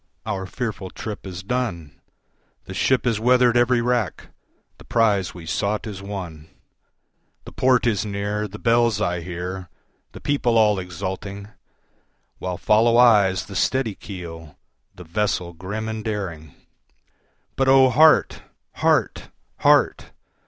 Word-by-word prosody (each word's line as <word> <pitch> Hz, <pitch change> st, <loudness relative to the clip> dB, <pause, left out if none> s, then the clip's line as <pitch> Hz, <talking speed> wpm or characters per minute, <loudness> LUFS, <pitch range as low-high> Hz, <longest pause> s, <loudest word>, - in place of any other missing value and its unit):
our 95 Hz, -3 st, -3 dB
fearful 105 Hz, -4 st, -5 dB
trip 105 Hz, 0 st, -7 dB
is 90 Hz, 0 st, -7 dB
done, 95 Hz, -, -4 dB, 0.6 s
The -, -, -8 dB
ship 130 Hz, -1 st, +1 dB
has 115 Hz, -3 st, +1 dB
weather'd 125 Hz, +1 st, +4 dB
every 120 Hz, 0 st, +3 dB
rack, 120 Hz, -4 st, -1 dB, 0.5 s
the -, -, -13 dB
prize 100 Hz, -6 st, +1 dB
we 85 Hz, -2 st, -10 dB
sought 105 Hz, +6 st, -2 dB
is 100 Hz, -3 st, -7 dB
won, 90 Hz, -6 st, -7 dB, 1.0 s
The -, -, -10 dB
port 130 Hz, -2 st, +2 dB
is 110 Hz, -5 st, +1 dB
near, 105 Hz, +1 st, -3 dB
the 105 Hz, +1 st, -10 dB
bells 115 Hz, -2 st, +2 dB
I 90 Hz, -4 st, -1 dB
hear, 90 Hz, +1 st, -6 dB, 0.4 s
the -, -, -9 dB
people 125 Hz, -5 st, +1 dB
all 105 Hz, -3 st, +4 dB
exulting, 95 Hz, +3 st, -6 dB, 0.9 s
While 90 Hz, -1 st, -4 dB
follow 115 Hz, +4 st, +3 dB
eyes 100 Hz, -7 st, +4 dB
the 100 Hz, -, -10 dB
steady 130 Hz, +1 st, 0 dB
keel, 85 Hz, -6 st, -9 dB, 0.4 s
the 90 Hz, -, -11 dB
vessel 90 Hz, 0 st, -2 dB
grim 100 Hz, +6 st, -5 dB
and 110 Hz, -1 st, -4 dB
daring; 85 Hz, -10 st, -5 dB, 1.0 s
But 135 Hz, -, +1 dB
O 130 Hz, -1 st, +6 dB
heart! 155 Hz, +5 st, +4 dB, 0.4 s
heart! -, -, +1 dB, 0.3 s
heart! -, -, +2 dB
105 Hz, 130 wpm, -22 LUFS, 90-115 Hz, 1.0 s, O